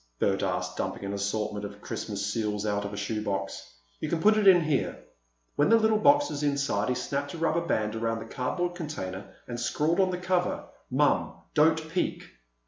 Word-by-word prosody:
Bert 95 +7 +1
asked, 90 -1 -2
dumping - - -3
an 100 - -3
assortment 105 +1 -2
of 100 0 -7
Christmas 100 -1 -4
seals 105 0 -1
out 100 -1 0
of 100 - -4
a 105 - -6
shoe 105 +1 -2
box. 95 -1 -4 0.3
"You - - -3
can 170 - 0
put 215 +5 +5
it 215 -2 +3
in 180 -2 +8
here." 155 -4 0 0.6
When 145 - +4
the 230 - +7
little 220 -1 +3
box 290 +5 +5
was 145 - -3
inside, 140 -7 0
he 125 - +1
snapped 140 +4 -3
a - - -6
rubber 165 +1 +1
band 110 -10 -1
around 115 0 -1
the 115 - -6
cardboard 175 +10 -2
container 105 - -6
and 120 -1 -5
scrawled 155 +8 +1
on 190 -1 +4
the 180 - -2
cover 180 0 0 0.2
"Mom—Don't 160 +1 +2
peek!" 180 - -1
125 Hz, 195 wpm, -28 LUFS, 105-170 Hz, 0.6 s, in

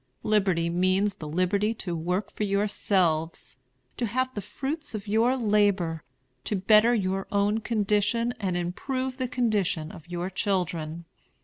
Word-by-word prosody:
Liberty 190 -6 +2
means 185 +4 +1
the 155 - -7
liberty 195 +7 +1
to 175 -5 -4
work 180 +5 -2
for - - -3
yourselves, 195 -5 0 0.4
to 240 - 0
have 255 +4 -1
the 205 - -4
fruits 285 - -5
of 210 0 -6
your 230 +5 +3
labor, 205 -8 +2 0.4
to 210 - -1
better 215 +5 +5
your 195 -2 -1
own 205 +2 +2
condition, 220 +2 +1
and 185 -4 -1
improve 255 +9 -3
the 260 -2 -1
condition 205 -10 0
of 160 - -12
your 175 +2 -3
children. 175 -5 -2
200 Hz, 140 wpm, -27 LUFS, 180-220 Hz, 0.4 s, better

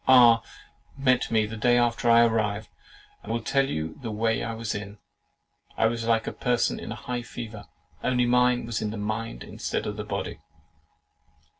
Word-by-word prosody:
R—— 120 -3 +7 0.6
met 130 -2 +2
me 110 -2 +2
the 110 +1 -6
day 120 +3 +3
after 120 0 +2
I 115 0 +7
arrived, 110 -2 0 0.5
and 110 - -7
will 115 - 0
tell 135 +3 +2
you 80 - -4
the 120 - -4
way 110 +1 0
I 115 -1 -3
was 115 0 -3
in. 105 0 -6 0.8
I - - +3
was 115 0 0
like 115 -1 +2
a - - -4
person 125 -2 0
in - - -7
a - - -3
high 125 -1 -4
fever; 115 -3 -8 0.4
only 125 -1 +2
mine 125 0 +3
was 115 -2 -3
in 105 - -1
the 110 - -5
mind 110 - -3
instead - - -4
of - - -4
the - - -3
body. - - -4
115 Hz, 185 wpm, -26 LUFS, 110-120 Hz, 0.8 s, R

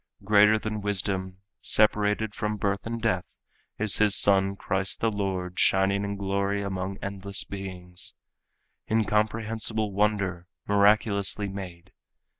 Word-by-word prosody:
Greater 105 +1 +5
than 110 -1 -4
wisdom, 95 -2 -2 0.2
separated 105 0 +3
from 105 +1 -3
birth 100 +1 -2
and 115 0 -5
death, 95 -6 +1 0.5
Is 110 -1 +1
his 105 -2 +5
son 100 -1 +4
Christ 95 -2 -1
the 115 - +1
Lord 95 -3 -3
shining 95 +1 +2
in 100 0 -3
glory 100 +1 -1
among 95 0 -4
endless 100 0 -1
beings. 90 -2 -7 0.7
Incomprehensible 110 0 0
wonder, 100 -4 -1 0.2
miraculously 100 0 +2
made! 95 -2 -9
100 Hz, 115 wpm, -26 LUFS, 95-105 Hz, 0.7 s, Greater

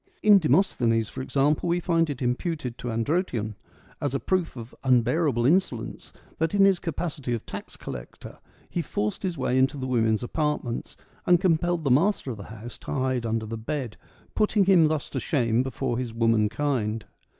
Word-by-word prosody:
In 210 -2 +8
Demosthenes, 120 - +2
for - - -6
example, 145 +5 +1
we 175 +1 +2
find 165 -2 +1
it 140 -2 -4
imputed 125 0 -2
to - - -5
Androtion, 115 - -1 0.5
as 140 -2 -1
a - - +1
proof 185 -2 -1
of 115 -1 -9
unbearable 125 0 +2
insolence, 135 -7 0 0.3
that 160 +4 0
in 195 -1 +6
his 195 -3 +4
capacity 150 -6 -3
of 115 - -7
tax - - -8
collector - - -9 0.3
he 175 - -2
forced 105 -8 -2
his 180 -4 -2
way 130 -1 +1
into 135 +2 +2
the 130 - -4
women's 115 -3 +1
apartments, 150 -3 -2 0.3
and 175 -1 +6
compelled 175 -1 +1
the 140 - +1
master 160 0 +2
of 115 - -6
the 100 - -9
house 110 +2 -9
to - - -8
hide 130 -3 0
under 110 0 -1
the 110 +1 -5
bed, 125 0 -4 0.4
putting 210 -2 +2
him 180 -4 +6
thus 155 -2 -1
to - - -2
shame 120 -6 +1
before 130 -2 -2
his 120 -3 -4
womankind. 115 0 +1
130 Hz, 175 wpm, -26 LUFS, 115-165 Hz, 0.5 s, In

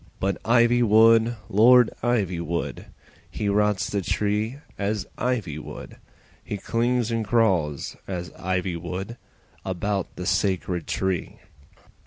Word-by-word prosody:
But 95 +1 -1
Ivywood, 115 -1 +4
Lord 120 +4 +6
Ivywood, 90 -8 -1 0.4
He 105 - -3
rots 105 -1 +1
the 100 - -1
tree 105 +6 -1 0.2
as 105 +1 -2
ivy 110 - -2
would, - - -9 0.5
He 105 - -4
clings 120 +2 0
and 115 -1 0
crawls 95 -11 +1
as 90 -4 -5
ivy 95 -1 -2
would 95 +7 -6 0.5
About 95 +1 -2
the 90 - -6
sacred 95 -3 0
tree. 95 -2 -2
105 Hz, 110 wpm, -24 LUFS, 95-115 Hz, 0.5 s, Lord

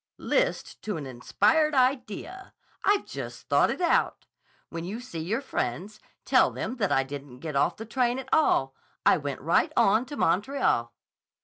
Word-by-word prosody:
"List - - -1
to 210 -5 -3
an 150 - -6
inspired 295 - +1
idea! 260 - -1 0.3
I've 405 0 +2
just - - -8
thought - - +4
it - - -3
out. 340 -2 +1 0.4
When 165 0 -6
you 200 +6 -5
see 240 -10 -7
your 205 +11 -2
friends, 205 - -4 0.3
tell - - +4
them 250 +4 -5
that 200 -5 0
I 135 - +3
didn't 140 -1 -9
get 150 +2 -6
off 140 - +1
the 225 - -7
train 245 +2 0
at 265 -1 -6
all. 135 - +3 0.3
I - - +6
went 145 -3 -5
right 165 +5 +2
on 220 +6 +3
to 290 - -7
Montreal." 180 - +1
210 Hz, 170 wpm, -27 LUFS, -, 0.4 s, I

